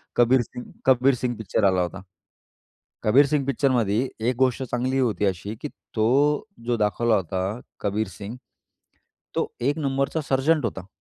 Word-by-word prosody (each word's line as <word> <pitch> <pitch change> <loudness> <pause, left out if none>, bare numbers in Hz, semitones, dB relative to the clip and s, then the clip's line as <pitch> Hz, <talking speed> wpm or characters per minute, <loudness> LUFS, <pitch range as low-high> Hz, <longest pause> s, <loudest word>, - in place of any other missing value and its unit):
Kabir 120 +2 +5
Singh, 125 +1 -8 0.2
Kabir 130 +1 +5
Singh 120 0 -2
picture 110 -1 -1
आला 95 -2 +3
होता. 90 +3 -4 1.0
कबीर 130 +7 +6
सिंग 140 -1 0
पिक्चरमध्ये 125 -4 +1 0.2
एक 125 - -1
गोष्ट 130 0 +2
चांगली 130 +1 -1
होती 110 -6 +1
अशी, 100 +3 -2
की - - -3 0.3
तो 140 - +3 0.2
जो 120 -1 +1
दाखवला 110 +2 +2
होता 95 +3 -2 0.2
कबीर 105 +2 0
सिंग, 105 +4 -7 1.0
तो - - 0
एक 140 +6 0
नंबरचा 140 +1 0
सरजंट 140 +3 +2
होता. 95 -5 -3
120 Hz, 145 wpm, -24 LUFS, 105-135 Hz, 1.0 s, कबीर